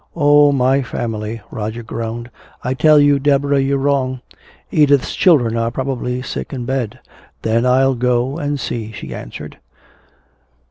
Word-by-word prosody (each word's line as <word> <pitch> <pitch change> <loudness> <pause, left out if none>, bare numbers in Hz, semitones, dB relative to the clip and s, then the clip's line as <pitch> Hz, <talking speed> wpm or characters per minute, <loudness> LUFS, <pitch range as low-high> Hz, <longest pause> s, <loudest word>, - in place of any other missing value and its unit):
"Oh, 145 -2 +5
my 135 0 +2
family!" 115 -3 -4
Roger 110 +2 -5
groaned. 115 +1 -5 0.3
"I 125 - -1
tell 155 +3 +5
you, 145 -1 +4
Deborah, 140 0 +2
you're 135 +1 +1
wrong! 135 -2 0 0.5
Edith's 145 -3 +3
children 130 - +3
are 115 0 0
probably 125 0 -3
sick - - -5
in 125 -3 -5
bed!" 130 -4 -2 0.5
"Then 115 +2 +1
I'll 135 +1 +3
go 125 +4 0
and 145 -2 -2
see," 110 -4 -4
she 105 - -8
answered. - - -9
130 Hz, 140 wpm, -18 LUFS, 115-140 Hz, 0.5 s, Oh